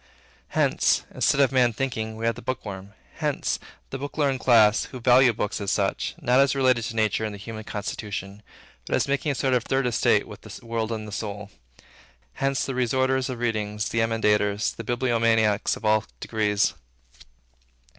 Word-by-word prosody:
Hence, - - +2
instead 140 - +2
of 135 - +4
Man 125 -3 +3
Thinking, 110 -3 -3
we 115 +1 -4
have 115 - +2
the 125 - -11
bookworm. 100 -6 -6 0.2
Hence, - - -1 0.3
the 135 - -4
book 145 +2 -7
learned 140 -3 +1
class, 110 -4 +5
who 130 - -9
value 125 +1 +5
books, 105 -1 -3
as 100 - -2
such; 100 -2 -1
not 130 -4 +3
as 140 -1 +3
related 130 -4 +2
to 115 - -5
nature 110 -1 +1
and 105 -2 -3
the - - -9
human 110 +2 -8
constitution, 100 -1 -5 0.5
but - - 0
as - - +1
making 140 +2 0
a - - -3
sort 130 0 0
of 125 -2 +2
Third 135 +1 0
Estate 120 -4 +2
with - - -11
the - - -11
world 115 -1 -2
and 110 -1 -4
the - - -8
soul. 105 0 -5 0.8
Hence, 135 0 -1
the 135 - -3
restorers 130 +1 +1
of 130 - -4
readings, 105 -2 -2
the 115 - -1
emendators, 105 -2 +1
the 115 - -7
bibliomaniacs 115 -3 +1
of - - -10
all 110 0 +3
degrees. 105 -2 0
115 Hz, 180 wpm, -25 LUFS, 105-130 Hz, 0.8 s, class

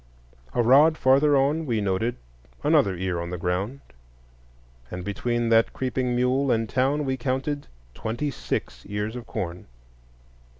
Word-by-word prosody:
A 120 - +3
rod 145 +7 +6
farther 140 +2 +4
on 145 +4 +1
we 115 -3 +1
noted 100 +4 0 0.5
another 95 -2 +3
ear 90 -1 -2
on 85 - -5
the 90 - -4
ground; 95 +10 -2 1.1
and 90 0 -6
between 120 +3 -1
that 115 0 +4
creeping 125 -1 -1
mule 130 +3 +2
and 115 -1 +1
town 135 +5 +1
we 130 -1 -1
counted 135 +3 -2 0.3
twenty 120 - -3
six - - -4
ears 105 +3 -3
of 120 -2 -7
corn. 90 -1 -5
120 Hz, 140 wpm, -25 LUFS, 100-135 Hz, 1.1 s, rod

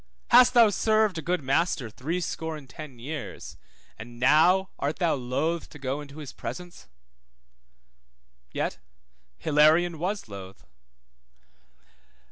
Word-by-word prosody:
Hast 250 +1 +7
thou 230 -3 +7
served 215 -4 +2
a - - -4
good 175 0 -1
master 135 -1 +1
threescore 160 +5 -4
and 140 -3 -13
ten 140 -2 -10
years, 145 +6 -7 0.4
and 120 +2 -10
now 175 +9 +4
art 145 +2 -2
thou 175 -3 +2
loth 140 +6 -2
to - - -12
go 140 +1 -3
into 145 0 -11
his 150 -4 -8
presence? 175 -1 -8 1.6
Yet 60 - -3 0.6
Hilarion 155 - +3
was 195 - -3
loth. 100 -2 -10
155 Hz, 115 wpm, -26 LUFS, 135-175 Hz, 1.6 s, Hast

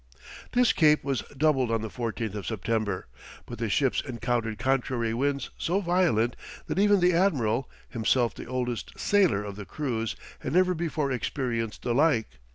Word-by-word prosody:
This 245 -1 +4
cape 150 -2 +4
was 135 -3 -1 0.2
doubled 135 -4 +2
on 115 -1 0
the - - -2
14th 115 -2 -3
of 105 -2 -5
September, 110 -2 -1 0.4
but - - -8
the - - -1
ships - - +2
encountered 120 -3 -2
contrary 125 -2 0
winds 140 +1 -1
so 180 +4 +1
violent, 175 - +2 0.3
that - - -2
even 205 -1 +4
the 180 0 +4
admiral, 135 - +1 0.2
himself 115 +1 +1
the - - -9
oldest 125 -2 -3
sailor 190 - +3
of 100 -1 -7
the 100 - -7
crews, 115 -7 -2 0.2
had - - -4
never 185 +1 +4
before 155 -4 -1
experienced 120 -3 -2
the 120 - 0
like. 130 - +2
125 Hz, 165 wpm, -27 LUFS, 115-155 Hz, 0.4 s, This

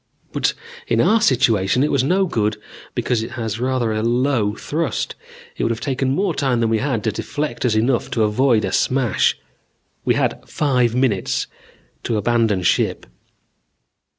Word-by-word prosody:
But - - 0 0.3
in - - +1
our 225 0 +4
situation 120 - +3
it 150 - +1
was 140 - +2
no 185 +7 +2
good 105 - -1 0.4
because 120 -3 0
it 115 - -6
has 115 -2 -4
rather 125 -2 0
a 110 0 -1
low 120 -2 +1
thrust. 160 0 -2 0.4
It - - -3
would - - +1
have 115 -1 -2
taken 135 -1 -1
more 195 0 0
time 130 -5 0
than 115 -1 +1
we 110 - +2
had 120 -4 -1
to 110 - +1
deflect 145 +7 -3
us 115 -3 +2
enough 120 +3 +1
to 110 - +4
avoid 110 0 +2
a 95 - -3
smash. 130 -2 +1 0.7
We - - +2
had - - 0
five 125 -5 +1
minutes 125 -7 0 0.6
to 115 - -1
abandon 110 -3 +1
ship. - - +1
120 Hz, 165 wpm, -20 LUFS, 110-135 Hz, 0.7 s, our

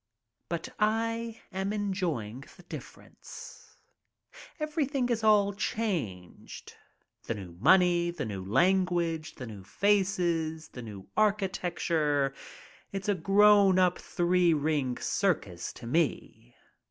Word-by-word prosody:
But 170 -1 -3
I 230 +1 0
am 190 +1 -2
enjoying 170 - -3
the 180 - -15
difference. 175 - -11 0.8
Everything 290 -4 -1
is 230 -2 0
all 205 -2 +4
changed. 175 - -4 0.5
The 115 - -1
new 95 -4 -8
money, 175 - +4
the 170 -5 -4
new 100 -4 -5
lan 185 - +3
guage, 165 -3 -2
the 125 - -7
new 105 -4 -9
faces, 175 - 0
the 125 - -9
new 100 -4 -9
architecture 175 -8 +1 0.3
— - - -23
it's 195 +1 -4
a - - +4
grown 195 +1 +5
ap 180 -1 +3
three 175 -2 +2
ring 145 -4 0
circus 125 - -1
to - - -11
me. 140 - -2
175 Hz, 115 wpm, -29 LUFS, 145-205 Hz, 0.8 s, grown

